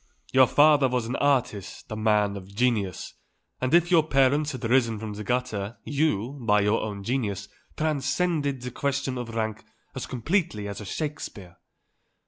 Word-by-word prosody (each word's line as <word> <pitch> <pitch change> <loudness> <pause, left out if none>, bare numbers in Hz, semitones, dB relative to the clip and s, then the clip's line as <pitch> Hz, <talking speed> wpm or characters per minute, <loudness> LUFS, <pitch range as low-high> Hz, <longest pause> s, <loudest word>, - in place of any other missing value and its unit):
Your 130 -1 +7
father 145 -1 +5
was 125 -2 -1
an 120 - -3
artist, 125 -11 -1
a - - -2
man 105 -2 +2
of 95 -2 -8
genius; 100 -3 -1 0.5
and 130 - 0
if 175 +1 +4
your 170 -3 +7
parents 145 0 +2
had 130 -5 -7
risen 115 -2 +2
from 105 0 -6
the 105 +1 -6
gutter, 120 -3 -2
you, 140 -3 -1
by 105 -2 +4
your 105 +2 +2
own 100 -2 -5
genius, 100 -5 -2 0.3
transcend 155 +2 0
the 130 -3 -3
question 140 -1 -2
of 115 -2 -6
rank 110 -1 -2 0.3
as 130 - -5
completely 130 - -1
as 100 +1 -6
a - - -7
Shakespeare." 105 - -5
125 Hz, 160 wpm, -26 LUFS, 105-140 Hz, 0.5 s, Your